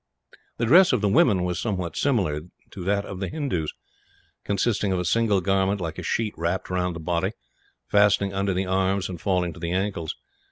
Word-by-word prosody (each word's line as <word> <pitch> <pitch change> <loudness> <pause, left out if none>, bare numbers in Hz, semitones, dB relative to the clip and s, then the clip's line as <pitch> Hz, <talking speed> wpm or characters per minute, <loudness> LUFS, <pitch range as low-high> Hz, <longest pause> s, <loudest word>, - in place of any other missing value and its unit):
The 120 - 0
dress 175 +7 +6
of 125 - +1
the 105 - +2
women 100 -2 +4
was 90 0 -2
somewhat 90 -7 -3
similar 95 - +1 0.3
to 95 - -7
that 100 +1 +1
of 95 - -7
the 95 - -3
Hindoos, 130 - -2 0.7
consisting 100 0 0
of 95 - +1
a 90 - -2
single 105 +1 +2
garment 95 +1 +1
like 85 -3 -4
a - - -4
sheet 110 -2 -1
wrapped 85 +3 -2
round 90 -1 -1
the - - -6
body, 85 +5 -1 0.5
fastening 100 -1 +3
under 95 -1 0
the 95 +1 0
arms 95 +1 0
and 90 -3 -7
falling 90 -3 0
to - - -12
the 85 0 -3
ankles. 95 -3 -2
95 Hz, 195 wpm, -25 LUFS, 90-105 Hz, 0.7 s, dress